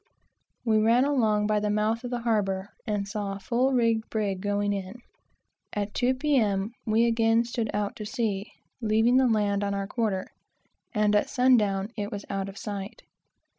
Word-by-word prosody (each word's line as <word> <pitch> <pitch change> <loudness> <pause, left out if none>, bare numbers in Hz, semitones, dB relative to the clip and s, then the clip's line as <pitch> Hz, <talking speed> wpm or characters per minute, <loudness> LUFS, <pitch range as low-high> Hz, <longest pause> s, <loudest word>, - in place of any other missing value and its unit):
We 220 -2 +3
ran 230 +4 +4
along 220 -7 +2
by 210 0 +2
the 210 0 -1
mouth 215 +3 0
of 245 - -4
the 245 -1 -3
harbor, 200 -4 0 0.2
and 205 -2 -1
saw 205 -1 -3
a - - -8
full 250 +6 +1
rigged 230 -3 +1
brig 200 -4 -2
going 205 0 0
in. 195 0 -5 0.8
At 205 0 -3
two, 255 +1 +1
P.M., 225 -8 +1 0.2
we 220 +2 +3
again 225 0 +3
kept 235 -2 -3
off 205 -1 -1
before 210 0 -7
the 235 - +1
wind, 200 -1 -3 0.4
leaving 225 +3 +3
the 260 -1 +4
land 205 -3 +1
on 200 0 -1
our 200 0 -2
quarter, 205 -3 -1 0.7
and 210 -2 +2
at 205 - +2
sun 255 0 +4
down, 200 -3 +1
it 205 -1 -4
was 205 -1 -6
out 195 0 -2
of 195 - -11
sight. 200 -1 -6
210 Hz, 185 wpm, -27 LUFS, 200-230 Hz, 0.8 s, ran